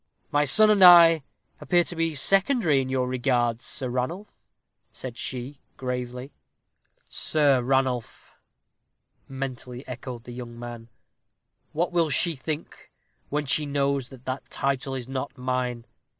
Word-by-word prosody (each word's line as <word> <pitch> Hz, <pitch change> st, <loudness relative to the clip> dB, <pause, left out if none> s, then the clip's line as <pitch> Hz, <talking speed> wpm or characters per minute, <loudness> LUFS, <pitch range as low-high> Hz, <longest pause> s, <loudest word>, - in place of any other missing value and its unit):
"My 145 Hz, 0 st, +3 dB
son 215 Hz, +10 st, +5 dB
and 200 Hz, -3 st, +4 dB
I 170 Hz, -3 st, +9 dB, 0.4 s
appear 175 Hz, -1 st, +2 dB
to 175 Hz, -, -5 dB
be 165 Hz, -1 st, -1 dB
secondary 195 Hz, -, +3 dB
in 130 Hz, -, -5 dB
your 130 Hz, -1 st, 0 dB
regards, 120 Hz, -2 st, 0 dB
Sir 130 Hz, -, -3 dB
Ranulph," 130 Hz, +12 st, -3 dB, 0.6 s
said 125 Hz, -3 st, -8 dB
she, 130 Hz, +3 st, -6 dB, 0.2 s
gravely. 125 Hz, +1 st, -5 dB, 0.7 s
"Sir 145 Hz, -4 st, +2 dB
Ranulph!" 130 Hz, -2 st, -1 dB, 1.0 s
mentally 130 Hz, -1 st, -6 dB
echoed 125 Hz, -1 st, -7 dB
the 125 Hz, -, -10 dB
young 120 Hz, -1 st, -8 dB
man. 120 Hz, -1 st, -8 dB, 0.8 s
"What 170 Hz, +4 st, -1 dB
will 170 Hz, -2 st, +2 dB
she 160 Hz, +4 st, +1 dB
think 155 Hz, +3 st, -6 dB, 0.4 s
when 150 Hz, +1 st, -1 dB
she 150 Hz, +2 st, 0 dB
knows 140 Hz, -2 st, 0 dB
that 130 Hz, -2 st, -14 dB
that 130 Hz, +1 st, -5 dB
title 135 Hz, 0 st, -2 dB
is 125 Hz, -2 st, -5 dB
not 135 Hz, +1 st, -5 dB
mine? 125 Hz, -2 st, -2 dB
135 Hz, 135 wpm, -25 LUFS, 125-150 Hz, 1.0 s, I